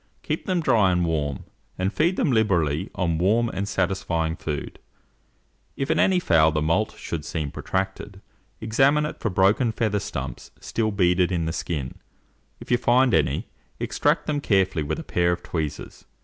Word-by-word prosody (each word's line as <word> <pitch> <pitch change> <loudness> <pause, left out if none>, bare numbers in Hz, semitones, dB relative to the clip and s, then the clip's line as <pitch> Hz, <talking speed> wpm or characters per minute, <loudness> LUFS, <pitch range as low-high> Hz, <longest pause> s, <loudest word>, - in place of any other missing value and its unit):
Keep - - -3
them 185 -2 +1
dry 110 - +3
and 90 -1 +1
warm, 75 -5 -2 0.3
and 95 +3 -1
feed 170 +4 +2
them 150 - +1
liberally 85 - +1
on 85 -3 0
warm 110 +6 +2
and 100 0 -3
satisfying 85 -4 -1
food. 75 -4 -5 1.0
If 135 - -1
in - - +1
any 185 -1 +4
fowl 80 - +4
the 75 - 0
moult 85 +8 0
should 80 -3 -5
seem 75 -3 -4
protracted, 95 +1 -4 0.4
examine 135 +7 +3
it 150 - -6
for 115 - -1
broken 100 +5 +3
feather 110 -2 0
stumps 65 -9 -6
still 110 -1 -1
beaded 90 -2 +2
in 85 -3 0
the 80 - -2
skin: 75 -6 -4 0.6
if - - -9
you 120 - +4
find 125 +1 +3
any, - - +1 0.3
extract - - 0
them 145 -1 -1
carefully 95 - +2
with 75 +1 -2
a - - -6
pair 85 0 +1
of 90 0 -3
tweezers. 80 -4 -5
95 Hz, 170 wpm, -24 LUFS, 80-115 Hz, 1.0 s, any